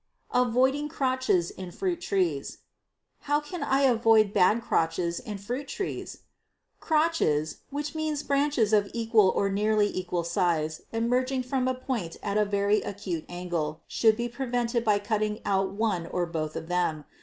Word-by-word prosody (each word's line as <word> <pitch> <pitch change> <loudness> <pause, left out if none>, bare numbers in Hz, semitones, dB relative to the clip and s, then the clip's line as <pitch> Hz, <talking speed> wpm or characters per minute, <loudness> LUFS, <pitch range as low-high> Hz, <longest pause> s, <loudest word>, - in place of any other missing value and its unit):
Avoiding 260 +4 +2
Crotches 260 - +1
in 185 -1 -8
Fruit 350 - -2
Trees. 175 - -1 0.7
How 290 0 +4
can 325 +4 -7
I 270 +1 +2
avoid 225 -5 +4
bad 215 +6 +4
crotches 170 -4 0
in 215 -5 -6
fruit 245 +8 -5
trees? 395 +7 -5 0.6
Crotches, 305 - +1
which 290 +1 -4
means 310 -2 -2
branches 280 -6 +1
of 205 -1 +3
equal 225 -4 +4
or 200 - +1
nearly 210 +1 +1
equal 180 -2 -2
size, 170 -3 0
emerging 255 +3 0
from 255 0 -1
a 255 - 0
point 245 -10 -4
at 200 -1 -2
a 210 0 +3
very 200 +1 +2
acute 190 -5 -4
angle, 170 -3 -3
should 220 -2 +3
be 240 0 -1
prevented 240 -1 -1
by 210 -3 +3
cutting 210 +1 -1
out 195 -1 +1
one 200 -5 -1
or 180 0 -1
both 155 -2 -4
of 160 - -5
them. 170 -4 -1
215 Hz, 155 wpm, -27 LUFS, 180-255 Hz, 0.7 s, How